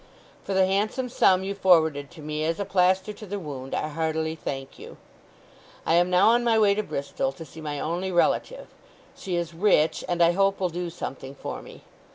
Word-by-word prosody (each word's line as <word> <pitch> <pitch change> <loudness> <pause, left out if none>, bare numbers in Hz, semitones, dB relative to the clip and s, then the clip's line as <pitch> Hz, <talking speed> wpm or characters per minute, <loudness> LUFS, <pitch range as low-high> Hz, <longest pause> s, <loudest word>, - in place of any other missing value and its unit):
"For 195 - -3
the 190 0 +5
handsome 215 +7 -1
sum 190 -5 +3
you 195 +1 -3
forwarded 160 -7 +3
to 155 - -13
me 155 0 -3
as 165 +3 -1
a 200 - -1
plaster 190 +2 +2
to 215 - -11
the 205 +2 -4
wound 140 -7 -6
I - - -1
heartily 160 0 -1
thank 135 -4 -6
you. - - -11 0.9
"I - - +2
am 175 +1 +4
now 180 +4 +5
on 240 +1 +3
my 230 -2 +3
way 210 -2 +5
to 210 - 0
Bristol, 210 - -3
to 165 - -10
see 160 - -12
my 145 -2 -4
only 175 +5 -2
relative. - - +1 0.5
She 185 -2 -4
is 170 -1 -2
rich, 165 -3 +2
and 175 -1 +2
I 170 - +5
hope 195 +2 +1
will 185 -2 0
do 175 +1 -4
something 135 -5 -7
for - - -6
me. - - -13
175 Hz, 205 wpm, -25 LUFS, 160-195 Hz, 0.9 s, the